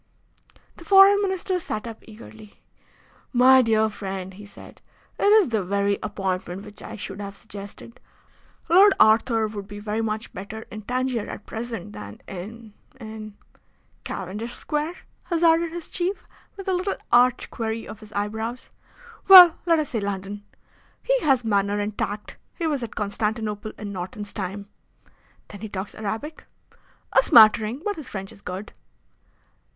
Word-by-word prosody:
The - - -11
Foreign 395 +3 +7
Minister 380 -1 -1
sat 215 -10 -5
up 225 -2 -8
eagerly. 220 -1 -14 0.7
"My 260 +1 +7
dear 220 -2 +2
friend," 190 -3 -6
he 205 +2 -12
said, - - -14 0.4
"it - - +1
is 415 - +6
the 220 -4 0
very 200 +2 0
appointment 195 -2 -4
which 210 0 -13
I - - -8
should 200 -2 -7
have 200 0 -7
suggested. 210 +2 -11 0.7
Lord 385 +5 +6
Arthur 225 +1 +4
would 205 -2 -6
be 205 0 -9
very 210 +1 -3
much 220 0 -3
better 200 +4 -7
in 215 - -7
Tangier 250 0 -2
at 205 - -8
present 225 - -6
than 105 -1 -9
in 215 +4 -9 0.3
in 215 -2 -9 0.3
" - - -39
"Cavendish 210 +6 -5
Square?" 305 +3 -3 0.3
hazarded 335 -1 +2
his 340 -1 -6
chief, 365 +3 -2 0.3
with 390 - -8
a 380 - +1
little 370 +2 -1 0.2
arch 245 +1 +4
query 225 0 -4
of 215 - -9
his 215 -1 -14
eyebrows. 220 +4 -4 0.6
"Well, 360 -3 +10
let 335 -1 +5
us 305 -2 -1
say 230 - -2
London. 200 0 -5 0.6
He - - +2
has 270 - +2
manner 205 -1 +1
and 205 0 -3
tact. 205 +1 -4 0.2
He 335 - -3
was 295 -4 0
at 235 - -6
Constantinople 210 +1 -2
in 205 -1 -6
Norton's 190 +3 -6
time." 200 +1 -5 0.8
"Then 205 - -10
he 220 - -6
talks 195 0 -6
Arabic?" 220 +9 -5 0.7
"A - - +7
smattering. 225 - +5
But 410 -3 -1
his 310 - -8
French 195 0 -6
is 210 -3 -16
good." 190 +3 -7
220 Hz, 155 wpm, -24 LUFS, 205-260 Hz, 0.8 s, Well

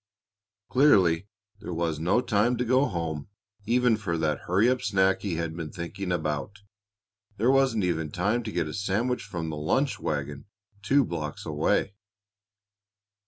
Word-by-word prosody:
Clearly, 100 - +4 0.3
there 90 -4 -6
was 80 -2 -1
no 90 +9 +2
time 120 +2 +1
to 125 - -1
go 130 +4 +3
home 80 -2 -4 0.4
even 120 -1 +3
for 90 -6 -2
that 80 -2 0
"hurry 100 +6 +4
up" 125 0 +1
snack 95 -1 +2
he 95 -5 -2
had 80 -1 -3
been 80 -3 -5
thinking 90 +1 -5
about. 85 +4 -3 0.7
There 115 +6 +3
wasn't 135 -6 +3
even 80 -3 -1
time 105 +9 0
to 110 - -4
get 80 - -1
a 75 - -6
sandwich 105 +6 -1
from 85 -5 -5
the 75 - -5
lunch 130 - 0
wagon, 70 -1 -3 0.4
two 135 +6 +3
blocks 75 -5 -5
away. 100 - 0
95 Hz, 155 wpm, -27 LUFS, 80-115 Hz, 0.7 s, Clearly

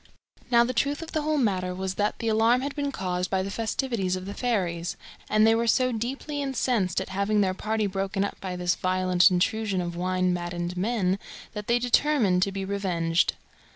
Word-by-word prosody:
Now 235 -1 +6
the 250 +2 -2
truth 285 +6 0
of 325 - -9
the 310 - 0
whole 305 0 0
matter 185 -8 0
was 190 0 -3
that 205 +2 -1
the 230 - -4
alarm 225 +3 +3
had 280 +1 -3
been 285 -1 -1
caused 180 -5 -2
by 190 -1 0
the 195 - -4
festivities 225 -3 -1
of 185 0 -6
the 200 - -5
fairies, 180 -8 -1 0.3
and 215 0 +4
they 225 - +5
were 230 +1 +1
so 255 +2 +3
deeply 270 +6 -3
incensed 245 -9 0
at 190 - -5
having 200 +2 +1
their 190 -2 +1
party 215 +2 -1
broken 195 0 -1
up 200 - -5
by 185 -2 -4
this 180 0 +1
violent 185 +1 +3
intrusion 195 +2 0
of 175 -1 -3
wine 185 +1 0
maddened 175 0 -3
men 195 -1 0 0.3
that 210 -2 -6
they 235 - +3
determined 245 -6 +2
to 195 - +1
be 195 0 -4
revenged. 180 -4 0
200 Hz, 200 wpm, -26 LUFS, 185-235 Hz, 0.3 s, Now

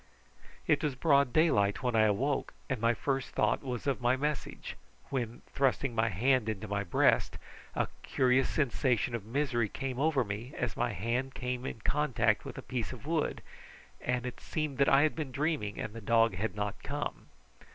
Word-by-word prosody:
It - - +2
was 145 -4 0
broad 140 -2 +3
daylight 120 -11 +3
when 125 -2 +1
I 110 -1 +5
awoke, 135 +7 0 0.2
and 130 -4 -1
my 115 0 +3
first 135 +1 -2
thought - - +2
was 125 -4 -4
of 140 -2 0
my 120 +2 +3
message, 150 +1 -3 0.4
when, 120 -4 -3
thrusting 135 -1 +1
my 115 0 +2
hand 115 +4 +2
into 110 0 -4
my 100 0 -1
breast, 85 - +2 0.4
a - - +1
curious 130 0 +2
sensation 125 -4 +1
of 115 -4 -3
misery 120 -3 0
came 130 +2 -4
over 145 -3 +3
me 110 +5 -5
as 120 -5 -2
my 120 -1 0
hand 120 +7 -2
came 125 0 -3
in 110 - -6
contact 150 -2 +1
with - - -7
a - - -6
piece 125 -3 -3
of 125 -4 -9
wood, 160 -1 -1 0.6
and 125 0 -1
it 125 - -5
seemed 155 -4 -3
that 140 - +5
I 135 +1 +6
had 155 - +2
been 150 -5 -4
dreaming 140 -7 -1
and 105 - -4
the 115 - -8
dog 115 0 +3
had 100 +2 -2
not 105 -1 -3
come. - - -4
125 Hz, 185 wpm, -31 LUFS, 110-140 Hz, 0.6 s, I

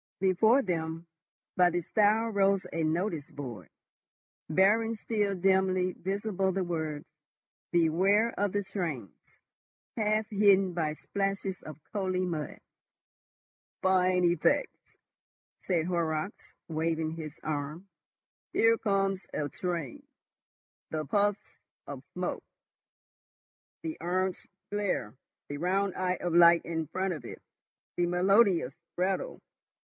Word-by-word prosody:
Before 220 +8 +4
them, 165 -2 -3 0.5
by 180 -1 +5
the 175 0 -1
stile 215 +5 +2
rose 195 -1 +2
a 165 - -1
notice 160 -1 -1
board, 120 - -8 0.8
bearing 215 +7 +3
still 210 -2 -1
dimly 185 0 +2
visible, 195 +1 -1
the 190 0 -1
words, 160 -4 -3 0.7
"BEWARE 190 +7 +3
OF 205 -1 0
THE 205 +1 -1
TRAINS," 170 - -4 0.8
half 215 -1 +1
hidden 195 -2 +4
by 155 -3 -1
splashes 195 +1 -3
of 155 -3 -9 0.2
coaly 185 -2 0
mud. 160 -5 -4 1.3
"Fine 185 -1 +3
effects," 175 - +2 0.9
said 170 -4 +1
Horrocks, 170 +1 -2
waving 160 0 -1
his 160 -2 -7
arm. 155 +4 -4 0.7
"Here 225 0 +4
comes 195 -2 0
a 145 -1 -2
train. 180 - -4 0.9
The 155 -1 -3
puffs 205 +6 0 0.3
of - - -8
smoke, - - -3 1.4
the 320 -1 -4
orange 185 +2 -1 0.2
glare, 205 - -1 0.3
the 145 - -5
round 190 +4 0
eye 185 0 0
of 175 -2 -2
light 170 0 +7
in 160 -2 -3
front 185 +4 -1
of 150 -6 -7
it, - - -8 0.6
the 175 0 +2
melodious 180 - +3 0.2
rattle. 195 - -1
185 Hz, 110 wpm, -30 LUFS, 165-200 Hz, 1.4 s, light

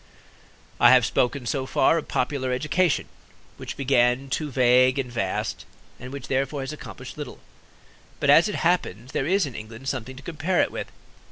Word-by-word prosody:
I - - +7
have 125 -2 +6
spoken 125 +2 0
so 130 +3 -2
far 165 +6 +3
of - - -9
popular 130 -3 -1
education, 155 +6 +1 0.5
which - - -7
began 130 -1 +2
too 155 +2 -1
vague 130 0 +4
and 130 -3 -2
vast 115 -6 -2 0.4
and 125 +1 -9
which 140 -2 -7
therefore 135 +1 -1
has 135 +3 -5
accomplished 150 - -10
little. - - -7 0.8
But 140 - +4
as 165 +7 +6
it 210 - -3
happens 130 - 0
there 135 - -1
is 190 0 +2
in 135 - -7
England 115 +5 -7
something 130 -1 -4
to 135 - -12
compare 170 +3 -1
it - - -2
with. - - -5
135 Hz, 175 wpm, -25 LUFS, 125-145 Hz, 0.8 s, I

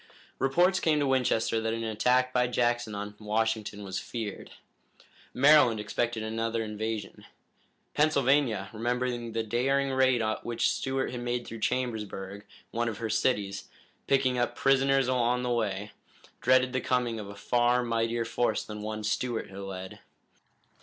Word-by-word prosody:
Reports 175 +8 +3
came 155 -2 +2
to 145 - +1
Winchester 120 -4 +1
that 115 0 -1
an 115 - -4
attack 125 +4 +2
by 125 0 +3
Jackson 120 -2 0
on 105 0 -5
Washington 110 -1 -1
was 95 -2 -3
feared. 110 -4 -6 0.8
Maryland 140 -4 +5
expected 110 +2 -2
another 115 +1 -2
invasion. 110 -1 -4 0.7
Pennsylvania, 140 -8 +2
remembering 120 0 -2
the 115 0 0
daring 135 +5 +1
raid 130 -3 +3 0.2
which 120 -1 0
Stuart 135 -1 -2
had 125 -1 -5
made 120 0 -2
through 115 - -8
Chambersburg, 105 -5 -3 0.2
one 115 0 0
of 110 - -5
her 110 -2 -3
cities, 105 -3 0 0.4
picking 130 -2 +2
up 120 - 0
prisoners 135 -1 +3
on 125 -1 +1
the 125 - -1
way, 105 -3 -1 0.5
dreaded 130 0 +4
the 130 - 0
coming 120 -3 0
of 100 -2 -7
a 100 - -9
far 120 +4 +2
mightier 115 0 0
force 115 -2 0
than 105 0 -8
the 105 - -6
one 110 0 -4
Stuart 115 +2 -1
had 95 - -8
led. 95 -1 -7
120 Hz, 150 wpm, -29 LUFS, 110-125 Hz, 0.8 s, Maryland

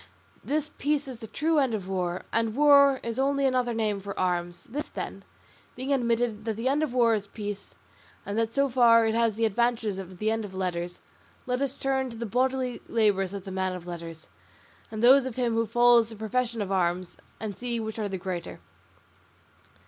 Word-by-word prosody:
This 300 +1 -1
peace 290 -1 0
is 255 -4 -7
the 225 - -8
true 315 +6 +1
end 260 -5 +1
of 195 -3 -5
war; 180 -2 -2
and 225 -1 +1
war 280 -2 +6
is 230 +1 -3
only 275 +1 +2
another 255 -2 +1
name 215 -3 0
for 200 0 -7
arms. 175 -1 -1
This, 290 +6 -5
then, - - -6 0.5
being 265 +3 -1
admitted, 235 -4 0
that 220 -2 -1
the 230 +4 -2
end 280 +3 +2
of 310 -5 0
war 240 -2 +4
is 205 -2 -2
peace, 205 -1 -7 0.5
and 200 - -4
that 225 0 -1
so 280 0 +3
far 235 -3 +5
it 220 - +1
has 230 -2 +2
the 225 +1 +1
advantage 225 -2 0
of 185 -1 -9
the 215 +3 0
end 225 0 -1
of 195 -2 -8
letters, 175 -2 -3 0.4
let 250 0 -1
us 280 0 -1
turn 265 -1 0
to 230 - -9
the 235 - -4
bodily 255 +2 0
labours 205 -4 +2
of 200 -2 -6
the 190 - -6
man 190 0 -1
of 180 -1 -7
letters, 170 -2 -8 0.6
and 220 +1 -5
those 260 +2 +7
of 250 - -6
him 245 -2 0
who 230 0 +1
follows 240 0 +5
the 225 - -8
profession 225 +1 -1
of 195 - -6
arms, 180 -1 0 0.2
and 210 -3 -4
see 240 +1 -3
which 220 0 -5
are 210 -2 -2
the 190 - -3
greater." 180 -2 -5
225 Hz, 205 wpm, -27 LUFS, 195-255 Hz, 0.6 s, those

